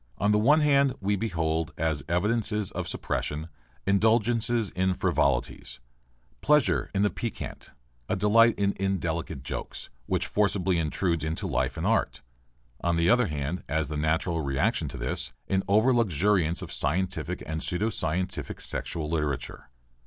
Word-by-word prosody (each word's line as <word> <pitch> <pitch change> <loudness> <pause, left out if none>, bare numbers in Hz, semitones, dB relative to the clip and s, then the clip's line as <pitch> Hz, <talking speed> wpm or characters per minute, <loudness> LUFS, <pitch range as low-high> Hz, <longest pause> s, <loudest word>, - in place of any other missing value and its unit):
On 105 +6 +2
the 105 - +4
one 145 +8 +5
hand, 140 -2 +3
we 100 +1 +1
behold, 80 -6 -1
as 80 -4 -1
evidences 105 +3 0
of - - -4
suppression, 75 +3 -3 0.4
indulgence 110 +3 +3
in 95 -6 0
frivolities, - - 0 0.6
pleasure 110 - +3
in 100 - +3
the 105 - +2
piquant, 115 -3 -6 0.4
a - - +1
delight 115 +2 +5
in 100 0 +1
indelicate 85 -7 -2
jokes, - - -5 0.2
which 90 -1 0
forcibly 95 -3 +1
intrude 85 +1 0
into 80 +1 -2
life - - -1
and - - -2
art; - - 0 0.6
on 85 -1 +2
the 85 +1 +4
other 125 -2 +4
hand, 75 +3 -3
as 80 -1 0
the 75 - -4
natural 80 +2 0
reaction 70 -2 0
to - - -7
this, - - -2
an 95 0 +1
over 110 +6 +4
luxuriance 95 -5 +2
of - - -7
scientific 90 +6 -1
and 80 +1 -4
pseudo 105 +6 0
scientific 90 +2 -2
sexual 80 -2 -3
literature. 75 -4 -3
95 Hz, 145 wpm, -27 LUFS, 80-105 Hz, 0.6 s, one